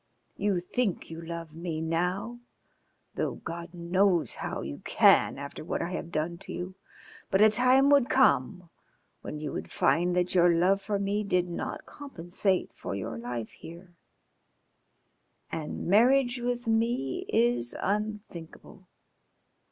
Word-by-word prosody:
You 200 -3 0
think 195 0 -2
you 165 0 -7
love 165 -1 -7
me 165 -1 -4
now, 180 +8 -2 0.7
though - - -2
God 170 0 -7
knows 175 +1 +1
how - - -3
you 70 +1 -6
can - - +4
after 140 +2 -7
what - - -2
I 175 - -3
have 170 -2 -5
done 165 +2 -2
to - - -10
you, 180 +1 -5 0.6
but 190 - +2
a 215 +1 +7
time 255 +5 +4
would 280 -4 +5
come 180 - +2 0.5
when 150 - -6
you 150 -1 -4
would - - -5
find 175 +1 +2
that 180 0 +1
your 175 -1 +5
love 190 +4 +3
for 205 +1 -1
me 200 +1 -1
did 180 -3 +1
not 175 - -5
compensate 190 - -2
for - - -5
your 100 +3 -5
life 120 -2 -5
here. 175 +2 -12 1.6
And 155 -2 -4
marriage 245 +5 +4
with 245 0 -2
me 225 - 0
is 120 0 +2
unthinkable. 200 -3 -5
180 Hz, 140 wpm, -28 LUFS, 165-210 Hz, 1.6 s, a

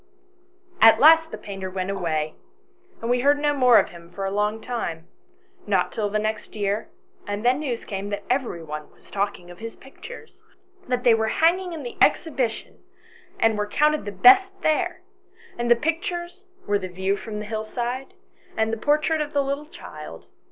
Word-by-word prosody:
"At 225 0 +8
last 320 +3 +7
the - - -7
painter 195 -2 -6
went 185 +1 -3
away, 155 -5 -2 0.7
and 230 - -2
we 245 - +3
heard 285 +3 +4
no 290 0 +1
more 250 -4 +6
of - - +3
him 170 -1 -13
for 195 +2 -5
a 195 - -2
long 210 +2 0
time, 175 -9 -4 0.6
not 190 -3 +1
till 210 -2 -2
the 210 - 0
next 215 0 -3
year, 205 +1 -1 0.4
and 205 +2 -3
then 255 +3 +4
news 255 -6 -3
came 200 -1 -5
that 205 0 -4
every 245 -10 -1
one 150 -1 -7
was - - -23
talking 195 -3 -3
of 175 - -13
his 230 0 -7
pictures 455 - -13 0.5
that 250 -1 -1
they 240 - +6
were 220 0 +1
hanging 350 +8 +2
in 315 -3 -6
the 240 - -7
Exhibition, 260 -8 +1 0.6
and 225 -2 +2
were 210 - -1
counted 300 +5 +2
the 205 - -4
best 385 - +7
there 355 +4 +1 0.5
and 240 0 -2
the 240 - +7
pictures 345 +6 -3 0.2
were 205 0 +1
the 185 - -5
view 190 +2 -1
from 210 +1 -7
the 210 - -5
hillside 240 +4 -4 0.4
and 220 0 +1
the - - -1
portrait 300 +4 +1
of 300 0 -4
the 285 -1 +2
little 280 +2 -3
child. 150 - -10
225 Hz, 185 wpm, -24 LUFS, 200-290 Hz, 0.7 s, At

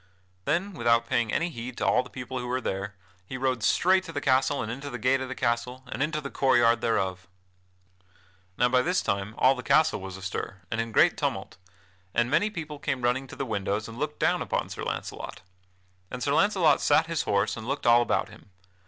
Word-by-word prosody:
Then, 190 +6 0
without 115 -5 +2
paying 115 -2 +1
any 170 +1 0
heed 120 -2 -7
to - - -1
all 125 - +4
the 125 - -12
people 130 0 -6
who 125 - -5
were 125 +1 0
there, 95 -3 -4 0.3
he 130 +8 -6
rode 130 -2 0
straight 185 - +3
to 165 - -7
the 145 - -2
castle 135 +1 +2
and 110 - -4
into 140 +4 -6
the 125 - -5
gate 130 +3 +2
of 130 - -4
the 130 - -4
castle 125 +1 -1
and - - -4
into 155 +1 0
the 140 -2 -7
court 135 -2 +3
yard 120 0 +4
thereof. 95 -4 -1 1.3
Now 125 - +4
by 125 0 +4
this 180 +6 0
time 100 +2 -2
all 130 - +5
the 125 - -6
castle 140 -3 +3
was 95 -1 -7
astir, 95 0 -5
and 110 - 0
in 115 0 -5
great - - +4
tumult, - - -3 0.6
and 120 +1 +2
many 210 +7 +3
people 155 -7 -7
came 135 -4 -2
running 125 +2 +1
to - - -10
the 135 - -3
windows 105 -1 -2
and 115 +2 -9
looked 150 +1 -3
down - - +2
upon - - -2
Sir - - -7
Launcelot. - - -5 0.7
And 125 0 -5
Sir 140 - +1
Launcelot 185 -5 +3
sat 150 +2 +4
his 165 -1 -1
horse 100 0 +1
and 110 0 -8
looked 140 +2 -3
all 120 0 +6
about 120 - 0
him. - - -16
125 Hz, 220 wpm, -27 LUFS, 115-145 Hz, 1.3 s, all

